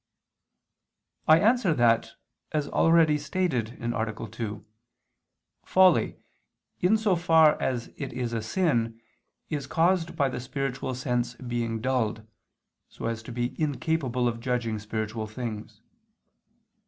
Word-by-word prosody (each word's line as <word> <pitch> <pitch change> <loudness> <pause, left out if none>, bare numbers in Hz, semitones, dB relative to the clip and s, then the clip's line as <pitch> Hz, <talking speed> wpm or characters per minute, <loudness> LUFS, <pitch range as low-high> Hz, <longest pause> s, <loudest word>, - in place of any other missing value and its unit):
I 155 - +8
answer 215 -6 +3
that, 115 -2 +3 0.4
As 150 -2 0
already 165 -2 +4
stated 145 - -1
(A. 110 -2 -3
2), 110 -2 -5 1.0
folly, 185 -3 +4 0.6
in 190 +5 +4
so 210 -4 +2
far 160 -3 +4
as 120 -3 -1
it 140 - -5
is 120 -1 -3
a 115 - -1
sin, 115 - 0 0.5
is 145 -3 -3
caused 170 0 +1
by 140 -4 +2
the 130 - -4
spiritual 130 0 -3
sense 125 -1 -1
being 120 -2 -3
dulled, 115 -4 -1 0.6
so - - -8
as 115 -1 -2
to 110 - -9
be 120 +1 -2
incapable 140 -4 0
of 115 -1 -2
judging 115 -3 -1
spiritual 110 +1 -4
things. 110 -1 -6
125 Hz, 120 wpm, -27 LUFS, 115-155 Hz, 1.0 s, I